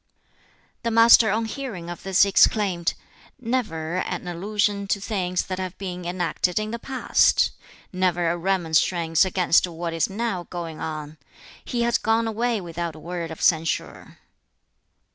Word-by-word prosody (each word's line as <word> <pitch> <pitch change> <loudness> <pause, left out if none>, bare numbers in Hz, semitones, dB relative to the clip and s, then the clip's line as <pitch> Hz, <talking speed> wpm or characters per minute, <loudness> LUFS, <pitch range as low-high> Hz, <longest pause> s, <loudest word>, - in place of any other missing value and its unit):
The 230 - -1
Master 230 0 +7
on 220 +3 0
hearing 220 -8 -6
of 175 0 -7
this 195 0 +4
exclaimed, 195 -3 +2 0.4
"Never 210 -10 -2
an 185 - -3
allusion 200 +3 -1
to 200 - 0
things 185 -3 -1
that 185 0 -5
have 185 -1 -5
been 180 -2 -6
enacted 175 0 -1
in 215 0 -1
the 235 - -4
past! 260 +1 +2 0.4
Never 180 -2 +1
a - - -1
remonstrance 170 -1 +1
against 180 -1 +3
what 170 0 -5
is 165 +2 0
now 195 -4 -3
going 165 -3 -6
on! 155 -1 -6 0.4
He 240 -1 -2
has 235 0 +2
gone 225 +1 +1
away 230 +1 0
without 170 -2 -5
a - - -11
word 170 +1 -5
of 160 - -7
censure." 160 -1 0
185 Hz, 145 wpm, -24 LUFS, 170-215 Hz, 0.4 s, Master